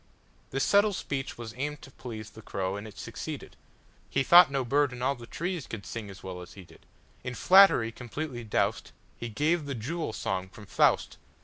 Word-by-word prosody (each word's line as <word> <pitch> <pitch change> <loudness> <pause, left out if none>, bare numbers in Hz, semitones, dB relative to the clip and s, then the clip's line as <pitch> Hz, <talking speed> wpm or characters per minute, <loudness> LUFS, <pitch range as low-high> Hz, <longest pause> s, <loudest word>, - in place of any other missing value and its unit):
'"This 135 +1 -1
subtle 205 +1 +4
speech 135 -6 -4
was 115 -2 -7
aimed 150 +2 -3
to 135 - -12
pleaseThe 110 -3 -9
crow, 95 -2 -2
and 100 +2 -6
it 105 - -13
succeeded:He 135 - -6
thought 175 +3 +8
no 135 -2 -1
bird 145 +2 +2
in 125 0 -6
all 135 +2 +2
the 120 -3 -11
treesCould 165 - -4
sing 115 -3 -6
as 95 - -11
well 90 -1 -6
as 90 - -11
he 95 - -11
did.In 125 +7 -12
flattery 185 -10 +6
completely 125 +2 -6
doused, 110 - -1 0.2
He 120 - -6
gave 150 +7 +1
the 140 - -3
"Jewel 150 +6 -3
Song" 95 -3 -3
from 105 +2 -13
"Faust." 100 - +2
125 Hz, 180 wpm, -29 LUFS, 110-145 Hz, 0.2 s, thought